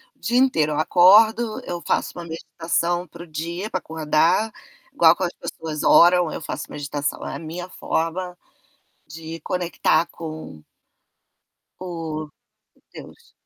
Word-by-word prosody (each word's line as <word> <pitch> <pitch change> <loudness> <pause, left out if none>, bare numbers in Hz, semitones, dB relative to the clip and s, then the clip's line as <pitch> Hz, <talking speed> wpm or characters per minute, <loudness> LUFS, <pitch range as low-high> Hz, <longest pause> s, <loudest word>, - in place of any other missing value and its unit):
o - - -37
dia 240 +2 0
inteiro, 160 - +3
eu 150 - -1
acordo, 215 +7 +5
eu 175 -1 -4
faço - - -1
uma 175 - -5
meditação 170 +2 -2
para 170 +2 -11
o - - -14
dia, 170 +6 -5
pra 185 -4 -2
acordar, 160 +7 +1 0.4
igual 165 0 +6
como 185 - -1
as 175 - -9
pessoas 155 -2 -5
oram, 175 -1 +6
eu - - -6
faço 150 -2 -6
meditação, 145 0 -3
a - - -5
minha 170 +3 -7
forma 180 +2 -3 0.7
de 165 +2 -8
conectar 170 -2 +1
com 155 - -9 1.2
o, 165 -4 -5 0.7
Deus. - - -13
170 Hz, 135 wpm, -22 LUFS, 155-180 Hz, 1.2 s, igual